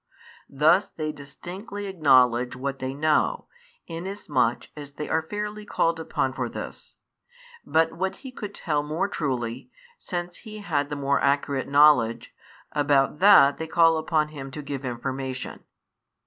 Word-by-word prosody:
Thus 160 +8 +4
they 155 -1 -4
distinctly 185 +8 -8
acknowledge 130 -9 +3
what 135 +1 -4
they 130 0 -3
know, 155 +1 +1 0.4
inasmuch 165 - -2
as 145 -2 -9
they 150 - -5
are 160 - +1
fairly 210 +5 -5
called 165 -5 0
upon 135 -4 -1
for - - -3
this; - - -8 0.7
but 160 0 +3
what 190 +3 -2
he 260 - -6
could 210 -5 -7
tell 150 -4 -1
more 155 +6 -1
truly, 130 - -3 0.3
since 175 -1 -5
he 215 -2 -10
had 145 -7 -1
the 145 - -3
more 140 0 0
accurate 140 -1 +1
knowledge, 140 -5 +4 0.4
about 145 -1 +2
that 180 -8 +7
they 160 - -4
call 165 0 +4
upon 155 -1 0
him 140 -3 -8
to 150 +3 -7
give 140 -1 -5
information. 130 +1 -5
150 Hz, 145 wpm, -25 LUFS, 135-175 Hz, 0.7 s, that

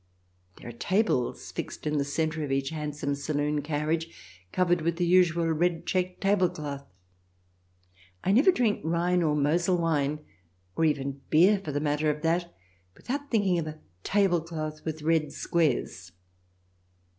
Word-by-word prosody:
There - - -11
are - - -5
tables 155 - 0
fixed - - -6
in 150 -1 0
the - - +2
centre 155 +2 -2
of 140 - -4
each 135 0 0
hand 150 -2 -4
some 145 -1 -2
saloon 145 +1 -1
carriage, 155 +2 -1 0.4
covered 175 -2 +2
with 170 +1 0
the 175 +1 0
usual 170 -1 +4
red 165 +1 0
checked 185 -1 -1
tablecloth. 170 -8 0 1.4
(I 190 - +2
never 270 - +6
drink 235 - +1
Rhine 170 +2 +1
or 155 -3 +2
Mosel 170 +5 +2
wine, 150 -3 0 0.5
or 165 - +2
even 140 -2 -1
beer 185 +6 +5
for 155 - -4
the 145 - -1
matter 150 +1 0
of 150 +1 -2
that, 170 +1 0 0.4
without 280 +3 -5
thinking 195 -6 +2
of 160 - -3
a 155 0 -7 0.2
tablecloth 165 -6 0
with 155 -1 -4
red 160 -1 +1
squares.) 130 - -1
160 Hz, 150 wpm, -28 LUFS, 150-175 Hz, 1.4 s, never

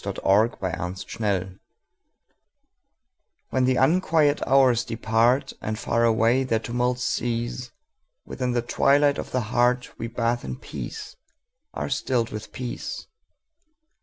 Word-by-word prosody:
The - - -4
Hour 100 +3 +6
of 120 - -8
Twilight 95 +2 -3 2.0
WHEN 130 -1 +2
the 130 0 +2
unquiet 155 0 +3
hours 130 -3 +4
departAnd 115 +1 0
far 115 +1 +1
away 115 +3 +3
their 115 -4 +1
tumults 125 +2 -1
cease, 120 +1 -2 0.6
Within 125 -2 -3
the 120 -1 0
twilight 140 +4 +3
of - - -5
the 130 - 0
heartWe 120 -1 0
bathe 120 0 0
in - - -5
peace, - - -7 0.6
are - - -3
stilled 125 -4 0
with 110 0 -7
peace. 125 -2 -6
120 Hz, 115 wpm, -25 LUFS, 115-130 Hz, 2.0 s, Hour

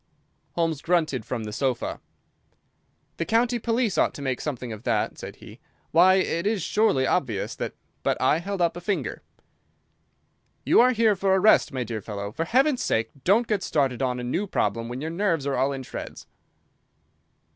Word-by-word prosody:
Holmes 165 -4 -1
grunted 155 -9 0
from 120 -3 -3
the 105 -1 -6
sofa. 130 0 -2 1.2
"The - - -1
county 240 +3 +2
police 230 -2 0
ought - - +2
to - - -7
make 130 -2 -2
something 125 -5 -4
of 110 - -9
that," 115 -3 -1
said - - -8
he; - - -13 0.3
"why, 185 +3 +6
it 185 -1 0
is 210 -5 0
surely 195 -11 +2
obvious 120 - -1
that—" - - -4 0.3
But - - 0
I 130 +5 +3
held 195 +2 -4
up 170 - +1
a - - -5
warning 175 - -19
finger. 205 - -2 1.4
"You - - +6
are 255 +1 +5
here 225 -2 +3
for 190 0 +2
a - - +3
rest, 215 +3 +5
my 130 -2 -2
dear 110 -2 -5
fellow. 100 -1 -5
For 165 +9 -3
Heaven's 265 - +2
sake 115 - 0
don't 215 +6 +4
get 210 -3 0
started 135 -8 0
on 125 -1 0
a - - -5
new 170 +12 -1
problem 115 - -1
when 125 +2 -5
your 160 +2 -3
nerves 170 -5 0
are 140 -1 0
all 135 +2 +1
in 135 -1 -5
shreds." - - -8
160 Hz, 190 wpm, -25 LUFS, 125-200 Hz, 1.4 s, why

